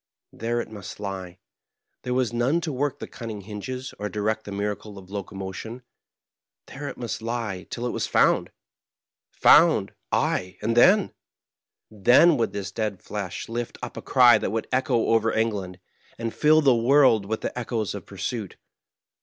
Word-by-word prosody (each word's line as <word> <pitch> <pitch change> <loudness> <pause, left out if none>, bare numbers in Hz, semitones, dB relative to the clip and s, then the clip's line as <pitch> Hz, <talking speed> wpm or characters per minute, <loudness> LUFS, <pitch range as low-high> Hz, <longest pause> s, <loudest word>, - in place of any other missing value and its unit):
There 120 +1 -2
it 115 - -5
must 100 -3 -9
lie; 95 -3 -6 0.6
there 125 0 -2
was 125 -2 0
none 125 +8 +2
to 160 -4 -3
work 140 +1 -1
the - - -6
cunning 110 -3 -7
hinges 110 +6 -6
or 105 - -3
direct 110 +2 -2
the 100 - -7
miracle 105 +1 -4
of 95 -1 -13
locomotion 100 +4 -6 0.4
— - - -67
^there 145 +2 -6
it - - -9
must 120 -2 -4
lie 115 -5 -4
till 120 - -4
it 125 - -1
was - - -2
found. - - +3 0.8
Found - - +5 0.2
I - - +3
ay, 90 0 -1
and 115 +2 0
then? 190 - +5 0.8
Then 120 - +5
would 115 - 0
this 100 -1 -5
dead 105 -3 -3
flesh 100 -4 -5
lift 120 +1 -4
up - - -6
a - - -6
cry 120 -4 +6
that - - -2
would 110 +2 -3
echo 130 -3 +1
over 115 0 +3
England, 100 -5 -2 0.4
and 115 -1 -4
fill 155 +1 +4
the 135 -4 +5
world 115 -4 +4
with 110 +1 -2
the - - -4
echoes 115 -3 -2
of 100 -4 -8
pursuit. 100 +1 -5
110 Hz, 170 wpm, -25 LUFS, 100-125 Hz, 0.8 s, cry